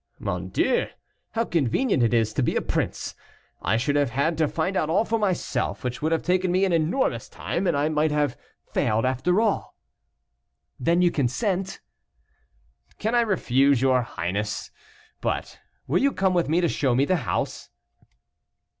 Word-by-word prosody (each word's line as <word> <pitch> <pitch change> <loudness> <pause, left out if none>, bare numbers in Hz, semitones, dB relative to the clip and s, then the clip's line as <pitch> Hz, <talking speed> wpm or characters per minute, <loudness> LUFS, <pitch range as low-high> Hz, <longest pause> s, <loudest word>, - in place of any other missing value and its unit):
"Mon - - -4
Dieu! 485 - +1 0.5
how 230 0 0
convenient 165 - +1
it 115 - +3
is 110 -2 +2
to 140 - 0
be 120 - 0
a - - +1
prince. - - -2 0.5
I 105 +6 +1
should 145 +5 0
have 145 -3 +2
had 140 +7 0
to 155 - +3
find 165 +6 -2
out 155 - 0
all 195 +7 +2
for 225 0 0
myself, 190 -5 -1
which 125 +1 -3
would 155 +2 0
have 165 - +1
taken 185 0 +1
me 185 +2 +3
an 185 - 0
enormous 165 - 0
time, 195 - -3
and 165 -4 +2
I 145 +1 +2
might 155 0 +1
have 150 -3 0 0.3
failed 110 +3 0
after 130 - +1
all." 220 -3 0 1.0
"Then 170 +7 +2
you 175 - +4
consent?" 185 - -1 1.2
"Can 220 +3 -1
I 240 - +5
refuse 140 - +2
your 130 -1 +3
highness? 105 -1 -3 0.5
But - - -3 0.3
will 155 +7 +1
you 280 +1 +3
come 190 -1 +1
with 175 -4 +1
me 170 +3 +3
to 170 - +2
show 135 -5 +1
me 135 +3 +3
the 185 +4 +2
house?" 135 - -3
155 Hz, 170 wpm, -25 LUFS, 130-185 Hz, 1.2 s, I